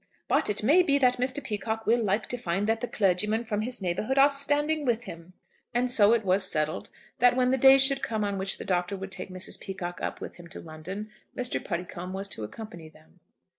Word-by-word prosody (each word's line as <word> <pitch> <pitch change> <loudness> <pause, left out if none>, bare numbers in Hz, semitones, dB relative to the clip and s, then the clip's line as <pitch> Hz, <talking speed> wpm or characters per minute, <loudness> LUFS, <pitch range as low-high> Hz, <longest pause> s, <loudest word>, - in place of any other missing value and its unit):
"But - - +2
it 210 0 0
may 300 +11 +6
be 280 -5 +3
that 250 -2 +3
Mr. 255 +3 0
Peacocke 220 +1 -3
will 235 +1 +3
like 205 +2 0
to 245 - -1
find 195 -1 -1
that 225 +1 0
the 245 - -2
clergymen 210 +3 +1
from 215 -2 -2
his 240 -2 -4
neighbourhood 200 +9 -1
are 280 +1 +6
standing 290 +2 +1
with 240 -3 0
him." 170 -3 -10 0.4
And 245 +1 +1
so 210 -4 +5
it 225 -3 +1
was 190 +1 +3
settled, 155 -2 -2 0.3
that 245 0 +5
when 255 0 +2
the 265 - +2
day 270 +1 +8
should 270 0 +2
come 220 -2 -2
on 200 -1 -2
which 190 0 -1
the - - -7
Doctor 180 +1 -1
would 190 0 -7
take 190 0 -6
Mrs. 185 0 -4
Peacocke 175 -2 -6
up - - -4
with - - -8
him 175 -1 -12
to - - -10
London, 185 +7 -8 0.3
Mr. 250 0 -2
Puddicombe 180 0 -5
was 195 +1 -3
to 110 - -6
accompany 170 - -9
them. 80 - -23
210 Hz, 225 wpm, -27 LUFS, 185-250 Hz, 0.4 s, day